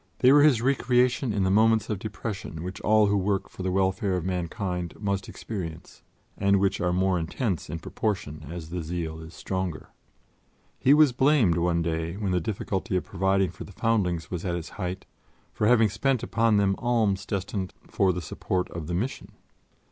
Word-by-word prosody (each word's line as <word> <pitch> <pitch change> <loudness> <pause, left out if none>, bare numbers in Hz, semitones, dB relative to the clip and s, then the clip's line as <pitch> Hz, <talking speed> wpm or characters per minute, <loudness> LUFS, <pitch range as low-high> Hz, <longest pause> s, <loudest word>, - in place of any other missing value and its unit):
They 130 - +5
were 145 +1 +7
his 135 -6 +4
recreation 125 -1 +2
in 100 -2 0
the 95 - +2
moments 110 +1 +4
of 105 -4 -2
depression 100 -6 -5
which 90 +1 -6
all 110 0 +4
who 100 0 +2
work 100 0 0
for - - -9
the 95 0 -1
welfare 95 0 +1
of 90 - -4
mankind 90 -1 -3
must 100 -2 -2
experience 85 -7 -7 0.3
and 100 0 +3
which 95 -1 +1
are 90 0 +1
more 95 0 +2
intense 85 - -2
in 80 - -3
proportion 80 -4 -3
as 85 -1 -7
the 90 0 -3
zeal 80 -1 -4
is 80 +1 -11
stronger. 95 -4 -4 0.9
He 140 +3 +5
was 150 -3 +6
blamed 125 - +3
one 85 -1 +1
day, 80 +2 -2
when 100 -3 -2
the 90 -1 +1
difficulty 95 +1 -2
of 90 - +1
providing 95 -1 +1
for - - -9
the - - -12
foundlings 90 -7 0
was 90 -2 -3
at 90 -2 -1
its 85 -1 -5
height, 95 -1 -5 0.5
for 105 - +1
having 115 -3 +5
spent 125 +4 0
upon 115 -2 +2
them 100 -1 +3
alms 110 -5 +1
destined 100 -1 -3 0.2
for 95 -1 +2
the 90 -1 -4
support 90 +2 -2
of 85 -3 -6
the 85 - -2
Mission. 120 +9 -4
95 Hz, 185 wpm, -26 LUFS, 90-110 Hz, 0.9 s, were